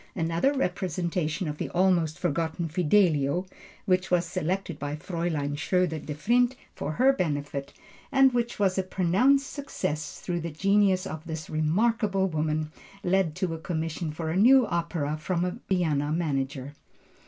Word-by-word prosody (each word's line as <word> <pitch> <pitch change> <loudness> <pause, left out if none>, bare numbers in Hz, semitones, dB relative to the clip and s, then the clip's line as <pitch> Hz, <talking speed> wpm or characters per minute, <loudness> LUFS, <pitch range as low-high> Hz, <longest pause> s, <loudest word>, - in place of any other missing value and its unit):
Another 165 +9 +1
representation 180 - -1
of 150 0 -5
the - - -3
almost 175 -3 +2
forgotten 165 0 -1
Fidelio, 165 -2 +2 0.4
which 185 0 +1
was 180 -1 +2
selected 175 0 -3
by 145 +1 -3
Fräulein 155 -3 -2
Schroeder 165 +1 0
Devrient 235 - +1 0.2
for 155 - -4
her 265 +7 +4
benefit, 145 - -2 0.4
and 270 -1 +5
which 240 -1 -1
was 195 -2 +2
a - - +1
pronounced 200 +10 +2
success 155 - -4
through 175 -1 -3
the 170 0 -4
genius 195 +3 +2
of 155 0 -6
this 160 -1 -6
remarkable 195 +5 +1
woman, 155 -2 -1 0.3
led 180 -4 +1
to 180 -3 -1
a 165 - -5
commission 165 0 -3
for 160 +1 -4
a - - -2
new 250 +5 +6
opera 170 -5 -2
from 175 +3 -1
a 180 - -4
Vienna 155 -6 +1
manager. 140 -4 -2
170 Hz, 145 wpm, -27 LUFS, 155-190 Hz, 0.4 s, new